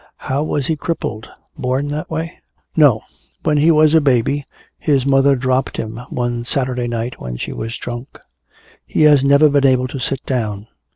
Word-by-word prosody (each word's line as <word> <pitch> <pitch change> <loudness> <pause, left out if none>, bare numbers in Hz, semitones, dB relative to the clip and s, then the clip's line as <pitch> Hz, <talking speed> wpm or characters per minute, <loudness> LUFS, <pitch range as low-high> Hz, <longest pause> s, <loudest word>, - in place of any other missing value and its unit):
"How 135 +2 -2
was 145 -2 -1
he 160 - 0
crippled? 145 -9 -4 0.3
Born 130 +3 -1
that 150 +1 -4
way?" 165 +2 -4 0.4
"No. 135 -8 +4 0.4
When 150 -2 +2
he 155 +3 +4
was 155 -1 +5
a 160 - +6
baby 140 +1 +1 0.3
his 140 -4 +1
mother 135 0 +4
dropped 130 0 -1
him 110 0 -5
one 120 -1 -2
Saturday 125 -1 -1
night 120 +1 -4
when 60 -1 -5
she - - -5
was 115 +1 -5
drunk. 120 +2 -7 0.7
He - - 0
has 145 -3 +6
never 140 +2 +5
been 140 -1 +3
able 130 -1 +2
to 135 - -5
sit 135 +1 -3
down. 105 -6 -2
135 Hz, 175 wpm, -18 LUFS, 120-145 Hz, 0.7 s, a